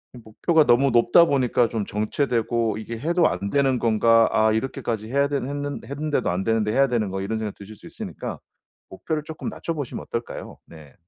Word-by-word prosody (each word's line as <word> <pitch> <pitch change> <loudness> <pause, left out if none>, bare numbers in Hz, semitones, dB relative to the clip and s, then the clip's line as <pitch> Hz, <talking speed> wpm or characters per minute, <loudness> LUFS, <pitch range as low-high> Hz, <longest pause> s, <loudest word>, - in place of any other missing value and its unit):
이 - - -10
목표가 155 +9 +2
너무 135 +3 +4
높다 120 +8 +5
보니까 125 -5 +2
좀 110 -3 -2
정체되고 115 +1 -1
'이게 115 +1 -6
해도 170 +5 +2
안 100 - -3
되는 135 0 +2
건가. 115 0 +4
아 110 0 +3
이렇게까지 110 -2 -3
해야 140 +1 +2
되는 140 -2 -2
했는 145 0 -4
했는데도 145 +2 -1
안되는데 105 +4 0
해야 135 +4 +3
되는 115 -5 -1
거' 95 +1 -4
이런 110 +3 -2
생각이 105 -2 -4
드실 100 +2 -11
수 - - -18
있으니까 - - -7 0.5
목표를 150 +10 -4
쪼끔 160 -1 -6
낮춰보시면 150 -6 -5
어떨까요. 115 0 -6
네. 80 -3 -14
120 Hz, 415 characters per minute, -23 LUFS, 110-140 Hz, 0.5 s, 높다